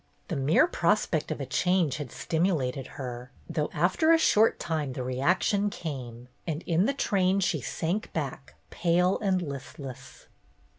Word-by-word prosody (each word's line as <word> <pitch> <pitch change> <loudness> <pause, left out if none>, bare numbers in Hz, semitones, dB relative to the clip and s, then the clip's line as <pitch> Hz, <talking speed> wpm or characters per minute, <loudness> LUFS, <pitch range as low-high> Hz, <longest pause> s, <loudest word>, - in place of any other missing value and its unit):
The 170 - -1
mere^ 145 - +4
prospect - - +1
of - - -3
a - - -3
change 180 -6 +1
had 145 -5 -6
stimulated 160 -7 -1
her, 125 -2 -6 0.2
though 150 -1 -1
after 185 - +2
a 330 - +7
short 225 -8 +4
time 155 -5 -2
the 125 - -4
reaction 180 - +1
came, 125 - -6 0.2
and 160 0 -3
in 175 +5 +2
the 280 - +1
train 195 -6 +2
she 165 -6 0
sank 175 - -2
back 135 -3 -5 0.2
pale 180 +2 +2
and 190 -4 +1
listless. 135 -2 -8
160 Hz, 150 wpm, -28 LUFS, 135-185 Hz, 0.2 s, a